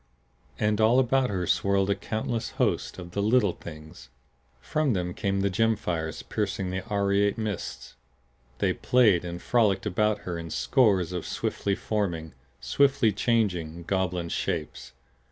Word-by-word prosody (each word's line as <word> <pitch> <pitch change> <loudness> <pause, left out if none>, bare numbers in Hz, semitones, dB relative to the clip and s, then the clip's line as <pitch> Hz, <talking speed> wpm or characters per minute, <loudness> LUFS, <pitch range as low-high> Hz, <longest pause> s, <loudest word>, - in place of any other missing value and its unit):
And 105 0 +1
all 115 +3 +5
about 130 0 +3
her 95 -3 -1
swirled 100 +2 +2
a - - +2
countless 110 +3 -3
host - - 0
of 90 -1 -8
the 100 - -2
Little 105 -3 +3
Things! 75 -5 -11 0.5
From 140 - 0
them 90 -2 -2
came 100 +1 -1
the 100 - +2
gem 115 +3 +2
fires 80 -5 -3
piercing 95 -3 -2
the 95 0 -3
aureate 100 0 +1
mists. 110 -4 -5 0.6
They - - +1
played 110 -9 +3
and 85 0 -5
frolicked 110 -2 +2
about 105 +3 +1
her 85 -2 -4
in 85 0 -7
scores 100 - +2
of 90 -2 -3
swiftly 100 -1 -1
forming, 85 -8 -2 0.3
swiftly 120 - +3
changing, 95 -7 0
goblin 90 -2 -1
shapes. 80 -3 -3
100 Hz, 145 wpm, -27 LUFS, 90-110 Hz, 0.6 s, all